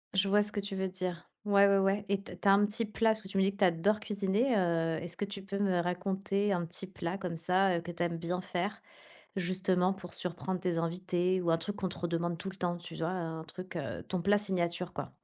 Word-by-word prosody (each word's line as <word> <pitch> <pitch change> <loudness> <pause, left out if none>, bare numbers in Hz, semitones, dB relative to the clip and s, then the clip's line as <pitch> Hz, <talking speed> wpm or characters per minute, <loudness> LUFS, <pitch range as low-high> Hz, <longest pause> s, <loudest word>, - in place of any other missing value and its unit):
Je 195 +1 +4
vois 205 +1 +5
ce 210 0 -1
que 205 - -2
tu 200 0 -3
veux 190 0 0
dire. 185 -2 -4 0.2
Ouais, 200 -1 +6
ouais, 200 0 +5
ouais 195 +1 +2
et 200 -1 +1
tu - - -10
as - - -7
tu - - -3
as 195 - +8
un 205 +1 +5
petit 220 +2 0
plat 220 +1 +2
parce 220 0 -2
que 190 - -10
tu 195 - -3
me 190 - +5
dis 195 - +3
que 200 - -15
tu 205 - +2
adores 190 +5 +3
cuisiner, 210 +4 +1
heu, 165 -3 +1
est-ce 170 0 -4
que - - -2
tu 200 0 -6
peux 200 +1 -4
me 190 -3 +2
raconter 195 +3 0
un 175 -2 +1
petit 180 +3 -6
plat 185 0 -4
comme 175 -3 -3
ça, 180 +2 +3
heu, - - -2
que 175 +1 -6
tu 170 0 -7
aimes 170 -1 -1
bien 180 +2 -2
faire, 180 +3 -3 0.6
justement 185 0 +2
pour 180 -2 -10
surprendre 180 +1 -2
tes 180 -2 0
invités 180 +2 0
ou 170 - +1
un 165 - +5
truc 205 +4 -4
qu'on 190 - -1
te - - -7
redemande 170 0 -1
tout 195 - -4
le 190 - -12
temps? 175 -2 -1
Tu 175 -1 -9
vois, 160 0 -1
un 165 -3 -3
truc 185 +3 -7 0.3
ton 185 -2 -1
plat 200 +3 +4
signature, 180 -3 -1
quoi. - - -5
185 Hz, 265 wpm, -32 LUFS, 175-200 Hz, 0.6 s, as